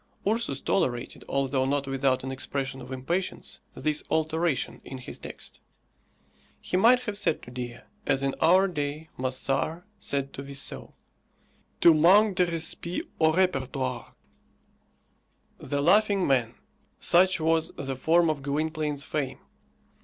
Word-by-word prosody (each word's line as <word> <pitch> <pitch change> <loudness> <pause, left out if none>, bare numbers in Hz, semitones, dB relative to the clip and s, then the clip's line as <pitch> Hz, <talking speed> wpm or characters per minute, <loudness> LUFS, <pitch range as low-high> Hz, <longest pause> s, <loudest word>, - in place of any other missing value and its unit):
Ursus 230 +3 0
tolerated, 125 -10 -1
although 135 -1 +1
not 140 +1 0
without 135 -1 0
an 135 - -4
expression 135 0 -3
of 125 +1 -10
impatience, 170 +9 -3 0.2
this 150 +1 -1
alteration 160 -1 0
in 135 - -8
his 125 - -8
text. - - -9 1.0
He - - -3
might 240 +7 +6
have 210 -5 -3
said - - 0
to 125 - -11
Dea, 125 -1 -6 0.3
as 135 0 +2
in 135 0 0
our 185 +4 +5
day 150 -2 -4
Moessard 135 +6 -1 0.2
said 140 -1 -2
to - - -6
Vissot, 140 0 -6 0.9
Tu 170 - +8
manques 190 +7 +6
de 180 -2 +2
respect 170 +1 -3
au 160 -1 +5
repertoire. 135 -8 -1 1.4
"The 140 0 -2
Laughing 200 +2 +4
Man." 125 -5 +1 0.4
Such 185 +1 +4
was 160 0 +2
the 135 -1 -3
form 165 +6 +3
of 145 -2 -5
Gwynplaine's 150 0 -2
fame. 135 -4 -3
150 Hz, 130 wpm, -27 LUFS, 135-170 Hz, 1.4 s, Tu